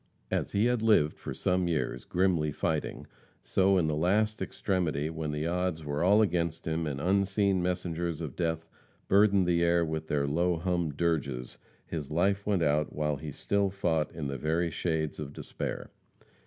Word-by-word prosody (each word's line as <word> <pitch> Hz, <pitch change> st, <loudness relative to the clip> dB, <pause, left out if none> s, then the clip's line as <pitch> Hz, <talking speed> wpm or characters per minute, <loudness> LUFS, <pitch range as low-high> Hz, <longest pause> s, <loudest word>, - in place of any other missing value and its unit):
As -, -, -1 dB
he 100 Hz, +3 st, +3 dB
had 120 Hz, -2 st, +2 dB
lived 105 Hz, -9 st, +3 dB
for -, -, -6 dB
some 90 Hz, -1 st, 0 dB
years, 80 Hz, -3 st, -2 dB
grimly 90 Hz, -5 st, +1 dB
fighting, -, -, -2 dB, 0.4 s
so 95 Hz, 0 st, +3 dB
in 85 Hz, -, +2 dB
the 75 Hz, -1 st, 0 dB
last 105 Hz, +7 st, +1 dB
extremity 80 Hz, -6 st, -1 dB
when 80 Hz, -1 st, -4 dB
the 75 Hz, +1 st, -2 dB
odds 85 Hz, -2 st, -1 dB
were 75 Hz, +2 st, -1 dB
all 105 Hz, +4 st, +5 dB
against 85 Hz, -4 st, -1 dB
him 80 Hz, 0 st, -1 dB
and 70 Hz, -2 st, -3 dB
unseen 100 Hz, +2 st, +2 dB
messengers 85 Hz, -2 st, -2 dB
of 80 Hz, -6 st, -5 dB
death 80 Hz, -1 st, -2 dB, 0.4 s
burdened 100 Hz, -1 st, +5 dB
the 85 Hz, -1 st, +2 dB
air 85 Hz, 0 st, +3 dB
with 80 Hz, 0 st, -4 dB
their 70 Hz, -1 st, +1 dB
low 85 Hz, +4 st, +1 dB
hummed 85 Hz, -4 st, -1 dB
dirges, 70 Hz, -7 st, -1 dB, 0.3 s
his 75 Hz, -4 st, -5 dB
life 100 Hz, +5 st, +1 dB
went 100 Hz, -5 st, +2 dB
out 75 Hz, 0 st, +1 dB
while 75 Hz, -1 st, -1 dB
he 75 Hz, +1 st, -6 dB
still 100 Hz, +7 st, 0 dB
fought 80 Hz, -5 st, 0 dB
in 80 Hz, -3 st, -5 dB
the 70 Hz, -2 st, -4 dB
very 80 Hz, +4 st, 0 dB
shades 80 Hz, -3 st, -2 dB
of 75 Hz, -1 st, -6 dB
despair. -, -, -5 dB
85 Hz, 175 wpm, -29 LUFS, 75-95 Hz, 0.4 s, all